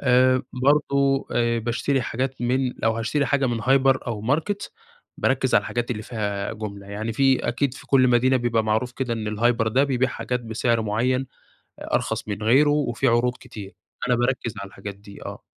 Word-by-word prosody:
آآ 130 Hz, 0 st, +4 dB
برضو 140 Hz, 0 st, +2 dB
آه، 120 Hz, -1 st, +1 dB
بأشتري 120 Hz, +3 st, 0 dB
حاجات 130 Hz, +2 st, -3 dB
من 125 Hz, +1 st, 0 dB
لو 115 Hz, -, +3 dB
هأشتري 135 Hz, +6 st, 0 dB
حاجة 140 Hz, +1 st, +1 dB
من 120 Hz, -2 st, -1 dB
هايبر 135 Hz, 0 st, +3 dB
أو 115 Hz, -3 st, -3 dB
ماركت 160 Hz, -, -1 dB, 0.5 s
باركز 130 Hz, -1 st, +1 dB
على -, -, +6 dB
الحاجات 120 Hz, 0 st, -3 dB
اللي 110 Hz, -2 st, -3 dB
فيها 105 Hz, -3 st, -3 dB
جملة، 100 Hz, -2 st, -7 dB
يعني 110 Hz, +3 st, -4 dB
في 135 Hz, +1 st, +2 dB
أكيد 125 Hz, +2 st, 0 dB
في -, -, -13 dB
كل 130 Hz, -2 st, +4 dB
مدينة 130 Hz, +2 st, +4 dB
بيبقى 115 Hz, -2 st, 0 dB
معروف 110 Hz, +4 st, 0 dB
كده 125 Hz, -2 st, -3 dB
إن 110 Hz, -2 st, -3 dB
الهايبر 115 Hz, +1 st, +1 dB
ده 135 Hz, +5 st, +3 dB
بيبيع 130 Hz, -2 st, +1 dB
حاجات 125 Hz, -1 st, -3 dB
بسعر 115 Hz, 0 st, 0 dB
معين 125 Hz, +5 st, 0 dB, 0.5 s
آآ، -, -, -5 dB
أرخص -, -, -1 dB
من 105 Hz, 0 st, -4 dB
غيره 135 Hz, +7 st, +5 dB
وفي 135 Hz, -3 st, +1 dB
عروض 120 Hz, +2 st, +2 dB
كتير، 100 Hz, -4 st, -10 dB, 0.3 s
أنا 125 Hz, -, +3 dB
باركز 120 Hz, -2 st, -1 dB
على 100 Hz, 0 st, -6 dB
الحاجات 100 Hz, +1 st, -8 dB
دي، 100 Hz, 0 st, -14 dB
آه. -, -, -8 dB
120 Hz, 185 wpm, -24 LUFS, 110-130 Hz, 0.5 s, على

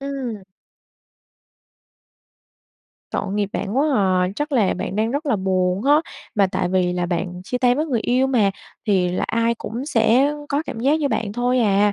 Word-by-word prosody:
Ừm. 265 Hz, -7 st, -5 dB, 2.7 s
Tội 190 Hz, -, -2 dB
nghiệp 205 Hz, -1 st, 0 dB
bạn 205 Hz, +5 st, -3 dB
quá 300 Hz, -, +3 dB
à, 185 Hz, -3 st, +2 dB
chắc 295 Hz, 0 st, -3 dB
là 215 Hz, -7 st, +2 dB
bạn 195 Hz, -, -4 dB
đang 220 Hz, +2 st, +1 dB
rất 290 Hz, +3 st, -3 dB
là 255 Hz, -, +2 dB
buồn 185 Hz, 0 st, 0 dB
ha. 290 Hz, +3 st, +5 dB, 0.3 s
Mà 200 Hz, -2 st, +4 dB
tại 180 Hz, -, -2 dB
vì 180 Hz, -1 st, +1 dB
là 175 Hz, -1 st, -1 dB
bạn 180 Hz, 0 st, -3 dB
chia 250 Hz, +6 st, -3 dB
tay 245 Hz, -1 st, +3 dB
với 305 Hz, +3 st, -1 dB
người 245 Hz, -6 st, 0 dB
yêu 255 Hz, +4 st, +2 dB
mà 230 Hz, -7 st, +2 dB, 0.4 s
thì 185 Hz, -3 st, +2 dB
là 180 Hz, -, -1 dB
ai 230 Hz, +1 st, +1 dB
cũng 235 Hz, +5 st, -6 dB
sẽ 250 Hz, +3 st, +3 dB, 0.2 s
có 285 Hz, +2 st, 0 dB
cảm 225 Hz, -, -5 dB
giác 290 Hz, +5 st, +2 dB
như 285 Hz, -, +1 dB
bạn 220 Hz, -3 st, -2 dB
thôi 245 Hz, +2 st, +1 dB
à. 205 Hz, -2 st, +3 dB
225 Hz, 185 wpm, -21 LUFS, 190-265 Hz, 2.7 s, ha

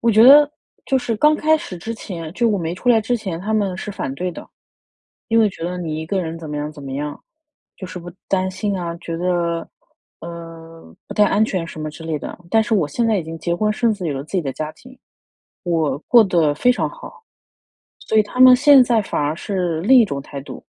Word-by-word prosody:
我 230 Hz, -, +2 dB
觉 220 Hz, +1 st, +5 dB
得 290 Hz, +3 st, +8 dB, 0.4 s
就 265 Hz, -, +2 dB
是 230 Hz, -3 st, -2 dB
刚 300 Hz, +6 st, +4 dB
开 315 Hz, +1 st, +3 dB
始 185 Hz, -, -8 dB
之 225 Hz, +7 st, -5 dB
前， 170 Hz, -7 st, -7 dB
就 235 Hz, +1 st, +2 dB
我 205 Hz, -, +1 dB
没 170 Hz, 0 st, -3 dB
出 245 Hz, -, -4 dB
来 230 Hz, -2 st, +5 dB
之 240 Hz, +3 st, -1 dB
前， 190 Hz, -7 st, -5 dB
他 210 Hz, +4 st, -3 dB
们 200 Hz, -4 st, 0 dB
是 205 Hz, -, -6 dB
反 135 Hz, -, -4 dB
对 180 Hz, +5 st, -3 dB
的。 -, -, -11 dB, 0.8 s
因 225 Hz, -, +3 dB
为 215 Hz, -, +4 dB
觉 190 Hz, -, -12 dB
得 180 Hz, +1 st, -3 dB
你 160 Hz, -3 st, -4 dB
一 160 Hz, -, -6 dB
个 190 Hz, 0 st, -1 dB
人 165 Hz, 0 st, -5 dB
怎 160 Hz, -2 st, -9 dB
么 150 Hz, -, -4 dB
样 150 Hz, +1 st, -4 dB
怎 145 Hz, -, -12 dB
么 135 Hz, -1 st, -7 dB
样， 145 Hz, +1 st, -5 dB, 0.6 s
就 185 Hz, -, -7 dB
是 180 Hz, -, -8 dB
不 175 Hz, +1 st, -9 dB, 0.2 s
担 190 Hz, -1 st, 0 dB
心 200 Hz, +2 st, -3 dB
啊， 170 Hz, -1 st, -4 dB
觉 165 Hz, -, -5 dB
得， 170 Hz, -1 st, -1 dB, 0.5 s
呃， 165 Hz, -, -11 dB
不 -, -, -7 dB
太 210 Hz, -, +5 dB
安 210 Hz, +2 st, +2 dB
全 185 Hz, -6 st, -3 dB
什 160 Hz, -, -10 dB
么 155 Hz, -, -4 dB
之 155 Hz, -, -12 dB
类 160 Hz, -2 st, -2 dB
的。 -, -, -8 dB
但 225 Hz, 0 st, +4 dB
是 230 Hz, -, -5 dB
我 165 Hz, -8 st, +1 dB
现 230 Hz, +11 st, -1 dB
在 215 Hz, -3 st, +2 dB
已 -, -, -3 dB
经 165 Hz, +1 st, -7 dB
结 170 Hz, +2 st, -1 dB
婚 210 Hz, +4 st, 0 dB
生 230 Hz, +1 st, +1 dB
子， 190 Hz, -4 st, -5 dB
有 145 Hz, -, -2 dB
了 135 Hz, -, -5 dB
自 -, -, -18 dB
己 190 Hz, -, +1 dB
的 135 Hz, -, -3 dB
家 155 Hz, 0 st, -4 dB
庭， 255 Hz, +1 st, -17 dB, 0.7 s
我 165 Hz, -5 st, 0 dB
过 235 Hz, -2 st, +7 dB
得 165 Hz, -6 st, +2 dB
非 250 Hz, -, +3 dB
常 250 Hz, -, -1 dB
好。 -, -, -13 dB, 0.8 s
所 220 Hz, -, -1 dB
以 215 Hz, -, +6 dB
他 250 Hz, -, -8 dB
们 255 Hz, 0 st, +9 dB
现 280 Hz, 0 st, +7 dB
在 235 Hz, -2 st, +2 dB
反 205 Hz, -, -3 dB
而 145 Hz, +2 st, -1 dB
是 175 Hz, -4 st, -2 dB
另 255 Hz, +6 st, +6 dB
一 225 Hz, -, +5 dB
种 140 Hz, -7 st, -4 dB
态 140 Hz, 0 st, -8 dB
度， -, -, -10 dB
180 Hz, 270 characters per minute, -20 LUFS, 165-225 Hz, 0.8 s, 们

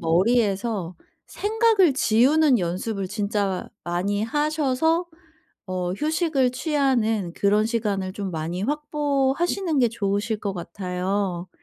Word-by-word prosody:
머리에서 195 Hz, +1 st, +1 dB, 0.3 s
생각을 430 Hz, -6 st, +2 dB
지우는 265 Hz, +4 st, +4 dB
연습을 185 Hz, +3 st, -3 dB
진짜 200 Hz, -2 st, -2 dB, 0.2 s
많이 190 Hz, +4 st, -1 dB
하셔서 305 Hz, +4 st, +1 dB, 0.6 s
어 180 Hz, -1 st, -2 dB
휴식을 300 Hz, -, +1 dB
취하는 250 Hz, -, 0 dB
그런 210 Hz, +2 st, +2 dB
시간을 205 Hz, -5 st, -1 dB
좀 200 Hz, -2 st, -4 dB
많이 165 Hz, +4 st, -3 dB
확보하시는 295 Hz, -, 0 dB
게 240 Hz, -, +4 dB
좋으실 210 Hz, 0 st, -1 dB
것 200 Hz, -2 st, -3 dB
같아요. 180 Hz, +1 st, -3 dB
220 Hz, 250 characters per minute, -24 LUFS, 190-290 Hz, 0.6 s, 지우는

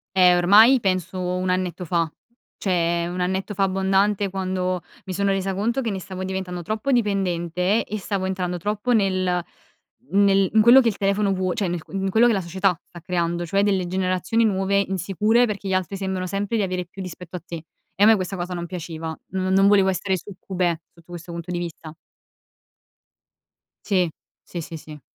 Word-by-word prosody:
Eh 180 Hz, -1 st, +6 dB
ormai 215 Hz, +8 st, +6 dB
penso 185 Hz, -1 st, -1 dB
un 180 Hz, +1 st, -1 dB
annetto 180 Hz, 0 st, -1 dB
fa, 165 Hz, -1 st, 0 dB, 0.5 s
cioè 170 Hz, -2 st, 0 dB
un 180 Hz, +1 st, -4 dB
annetto 190 Hz, +3 st, -1 dB
fa 195 Hz, 0 st, 0 dB
abbondante 195 Hz, +1 st, +1 dB
quando 185 Hz, -1 st, -2 dB, 0.2 s
mi 185 Hz, -, -5 dB
sono 200 Hz, +2 st, 0 dB
resa 195 Hz, 0 st, -1 dB
conto 235 Hz, +6 st, 0 dB
che 235 Hz, -, -1 dB
ne 195 Hz, -2 st, -3 dB
stavo 185 Hz, +1 st, -6 dB
diventando 185 Hz, -2 st, -4 dB
troppo 215 Hz, +9 st, -2 dB
dipendente 190 Hz, -3 st, +1 dB
e 215 Hz, -, -4 dB
stavo 195 Hz, -1 st, -3 dB
entrando 180 Hz, -1 st, -2 dB
troppo 210 Hz, +7 st, -2 dB
nel 185 Hz, -4 st, +2 dB, 0.7 s
nel 195 Hz, +1 st, +4 dB
in 220 Hz, -, +6 dB
quello 240 Hz, +4 st, +8 dB
che 235 Hz, -, +2 dB
il 205 Hz, -, -5 dB
telefono 200 Hz, 0 st, +1 dB
vuo 185 Hz, -1 st, 0 dB
cioè, 195 Hz, -1 st, -1 dB
in 190 Hz, +3 st, -3 dB
quello 225 Hz, +5 st, +5 dB
che 235 Hz, -, +3 dB
la 195 Hz, -, 0 dB
società 185 Hz, +1 st, 0 dB
sta 175 Hz, -, -12 dB
creando, 175 Hz, 0 st, -2 dB
cioè 195 Hz, +4 st, +1 dB
delle 190 Hz, -3 st, +1 dB
generazioni 185 Hz, +4 st, 0 dB
nuove 200 Hz, -1 st, +2 dB
insicure, 200 Hz, +6 st, +2 dB
perché 205 Hz, -3 st, -4 dB
gli 190 Hz, -, 0 dB
altri 185 Hz, +1 st, -1 dB
sembrano 190 Hz, -1 st, -3 dB
sempre 200 Hz, +4 st, -2 dB
di 210 Hz, -, +1 dB
avere 185 Hz, -1 st, -2 dB
più 190 Hz, +2 st, -10 dB
rispetto 180 Hz, 0 st, -7 dB
a -, -, -7 dB
te. 170 Hz, -3 st, -7 dB, 0.3 s
E 200 Hz, -, +2 dB
a -, -, +9 dB
me 225 Hz, -, +7 dB
questa 185 Hz, +1 st, -3 dB
cosa 180 Hz, 0 st, -4 dB
non 170 Hz, -1 st, -4 dB
piaceva. 165 Hz, -2 st, -6 dB
Non 185 Hz, 0 st, -1 dB
non 195 Hz, +1 st, +5 dB
volevo 195 Hz, -2 st, +5 dB
essere 190 Hz, 0 st, 0 dB
succube 180 Hz, -3 st, -3 dB
sotto 170 Hz, -1 st, -21 dB
questo 170 Hz, 0 st, -8 dB
punto 170 Hz, +1 st, -6 dB
di 175 Hz, -, -2 dB
vista. 165 Hz, -2 st, -7 dB, 1.9 s
Sì. 185 Hz, -5 st, +1 dB, 0.3 s
Sì, 175 Hz, -, -6 dB
sì, 165 Hz, +1 st, -7 dB
sì. 150 Hz, -1 st, -11 dB
185 Hz, 190 wpm, -23 LUFS, 180-200 Hz, 1.9 s, a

